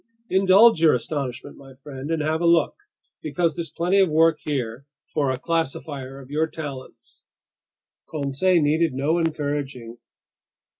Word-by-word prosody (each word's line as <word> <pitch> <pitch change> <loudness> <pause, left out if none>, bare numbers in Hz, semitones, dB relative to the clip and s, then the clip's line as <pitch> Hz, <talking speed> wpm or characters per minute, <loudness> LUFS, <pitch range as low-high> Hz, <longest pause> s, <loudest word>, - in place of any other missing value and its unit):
"Indulge 190 +1 +5
your 160 -4 +5
astonishment, 130 -1 -5
my 135 -1 -14
friend, 135 +1 -9
and 165 -2 -1
have 160 +2 -1
a 170 - +2
look, 170 -1 +3 0.5
because 170 -3 -1
there's 170 -1 -4
plenty 180 +4 +1
of 190 -3 +4
work 160 0 +3
here 130 -2 -4 0.2
for 145 -3 -1
a 130 - -1
classifier 140 -3 -3
of 135 0 -13
your 155 +2 +1
talents." 145 -5 -9 0.9
Conseil 155 +4 +1
needed 155 +1 +2
no 150 +6 +1
encouraging. 145 -7 -3
150 Hz, 140 wpm, -23 LUFS, 135-165 Hz, 0.9 s, Indulge